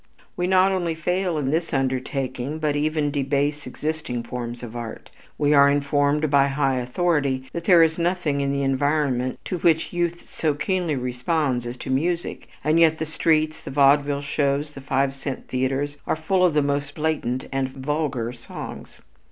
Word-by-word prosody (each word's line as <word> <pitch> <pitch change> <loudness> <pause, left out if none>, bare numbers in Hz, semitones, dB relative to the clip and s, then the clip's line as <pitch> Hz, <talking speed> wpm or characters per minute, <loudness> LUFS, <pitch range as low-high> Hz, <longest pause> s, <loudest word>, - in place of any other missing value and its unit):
We 180 0 -1
not 190 +1 +4
only 175 -3 -1
fail 180 +1 -1
in 135 -2 -1
this 165 0 -1
undertaking 130 +1 -2
but 150 -2 0
even 150 0 0
debase 145 +1 -1
existing 150 -3 -3
forms 120 0 -6
of 120 -1 -8
art. 115 -2 -7 0.3
We 145 0 +3
are 140 -1 +7
informed 145 +1 +1
by 140 -1 +5
high 135 -1 +1
authority 135 0 0
that 170 0 -4
there 175 -3 +7
is 160 +1 +1
nothing 170 -5 0
in 140 0 0
the 140 0 0
environment 135 -2 +1
to 180 - -3
which 165 +1 +2
youth 175 -1 -2
so 155 -3 -1
keenly 175 0 -1
responds 125 0 -1
as 120 +1 -6
to - - -5
music, 170 +6 -1 0.2
and 155 +3 +3
yet 160 -1 +5
the 160 - -2
streets, 155 0 +1
the - - -8
vaudeville 140 +1 +3
shows, 145 0 -1
the 140 - -9
five 135 0 0
cent 135 -1 -6
theaters 135 +3 -1
are - - +1
full 180 +4 +1
of 175 -4 +3
the 150 - +4
most 140 0 -2
blatant 150 -5 -1
and 135 -1 -1
vulgar 135 -3 -2
songs. 120 -1 -9
145 Hz, 175 wpm, -23 LUFS, 135-160 Hz, 0.3 s, are